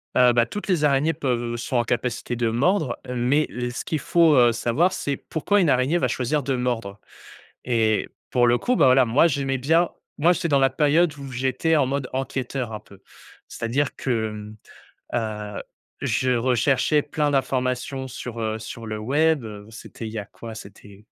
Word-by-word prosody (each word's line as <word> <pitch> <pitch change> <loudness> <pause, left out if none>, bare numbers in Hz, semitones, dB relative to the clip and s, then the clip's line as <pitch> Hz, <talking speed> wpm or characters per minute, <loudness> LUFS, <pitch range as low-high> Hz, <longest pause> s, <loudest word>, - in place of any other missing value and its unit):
Heu 125 -1 +6
bah, 120 0 +3
toutes 205 - -6
les 180 -6 +1
araignées 145 +2 +3
peuvent, 130 -6 -1
heu, - - -3
sont 120 +2 -2
en 120 - +3
capacité 120 +1 -2
de 120 0 0
mordre. 140 - +1
Mais 125 +5 +1
le 125 0 -4
ce 120 - -5
qu'il 160 - -2
faut, 165 0 +4
heu, 120 -2 +6
savoir, 130 +10 +1
c'est 140 -6 -2
pourquoi 200 +6 0
une 170 - +3
araignée 130 +7 +2
va 130 - +1
choisir 130 +4 -1
de 135 0 -1
mordre? 115 -5 -3 0.7
Et 110 -3 +1 0.2
pour 120 -1 +3
le 120 0 +4
coup, 250 - 0
bah, - - +4
voilà, 130 0 +6
moi, 125 +8 +4
j'aimais 135 -4 -1
bien 165 +6 +2 0.3
moi, 170 +4 +5
j'étais 170 -1 -2
dans 140 -3 +3
la 135 0 +4
période 150 +4 +2
où 140 -1 -8
j'étais 130 +6 0
en 140 -3 +3
mode 135 -1 -2
enquêteur, 130 -2 -3
un 105 - -5
peu. 100 -2 -18 0.5
C'est-à-dire 130 +5 -2
que, 115 -4 -1
hem, 105 0 -9 1.0
heu, - - -4 0.4
je 130 0 0
recherchais 130 +4 +2
plein 150 0 -1
d'informations 130 0 -1
sur, 120 -2 -7
heu, 110 0 -2
sur 115 +1 -8
le 110 0 -4
web, 145 +6 +1
heu, 105 -2 -9
c'était 115 0 -9
il 110 - -8
y 110 - -3
a 100 - -6
quoi? 115 +3 -10
C'était 100 0 -13
130 Hz, 195 wpm, -23 LUFS, 115-145 Hz, 1.0 s, Heu